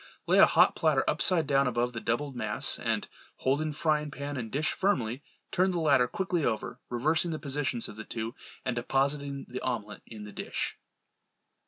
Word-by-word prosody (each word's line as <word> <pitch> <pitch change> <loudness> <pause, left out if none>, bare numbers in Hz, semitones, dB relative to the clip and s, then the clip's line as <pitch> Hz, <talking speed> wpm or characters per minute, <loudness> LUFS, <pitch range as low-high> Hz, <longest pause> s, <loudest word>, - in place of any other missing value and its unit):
Lay - - +4
a - - +9
hot - - +5
platter - - +2
upside 170 -4 +4
down 140 -1 +3
above 120 0 0
the 115 - -5
doubled 135 +4 -1
mass 110 -3 0
and - - -1 0.3
holding 150 +4 0
frying 150 0 0
pan 140 +1 -5
and 115 -4 -4
dish 150 +2 +1
firmly, 140 - 0 0.3
turn 185 +1 +3
the 180 -2 -1
latter 140 -6 +4
quickly 180 +3 -1
over, 110 -4 -2
reversing 155 +8 +1
the 160 - -2
positions 135 -5 -1
of 105 - -10
the 110 - -6
two, 115 +1 -4 0.3
and 125 - -1
depositing 140 +3 -1
the 125 +1 -6
omelette 105 -4 -3
in 110 -2 -9
the 105 - -9
dish. - - -4
135 Hz, 180 wpm, -29 LUFS, 120-150 Hz, 0.3 s, a